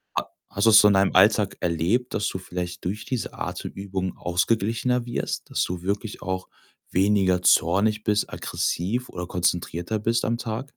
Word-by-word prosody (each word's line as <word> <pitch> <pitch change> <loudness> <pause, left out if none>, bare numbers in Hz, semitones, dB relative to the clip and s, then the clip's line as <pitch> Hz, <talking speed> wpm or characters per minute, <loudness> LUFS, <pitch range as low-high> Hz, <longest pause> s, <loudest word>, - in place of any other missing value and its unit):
A - - 0 0.2
hast 100 - -2
du - - +8
das 110 - +9
so 105 - +6
in 100 - +4
deinem 95 0 +3
Alltag 100 +1 +4
erlebt, 90 +9 0
dass 105 - 0
du 95 - -4
vielleicht 90 -1 -6
durch 100 +4 -3
diese 125 -3 -3
Atemübungen 95 -2 -5
ausgeglichener 115 +7 0
wirst? 120 - -3
Dass - - 0
du 90 -1 -5
wirklich 100 +3 -3
auch 95 0 -3 0.4
weniger 95 -1 +2
zornig 100 +6 +3
bist, 105 0 0
aggressiv 115 +9 -2
oder 90 0 -6
konzentrierter 90 +3 -1
bist 115 +2 0
am 115 +1 0
Tag? 120 +3 -4
100 Hz, 165 wpm, -24 LUFS, 90-110 Hz, 0.4 s, das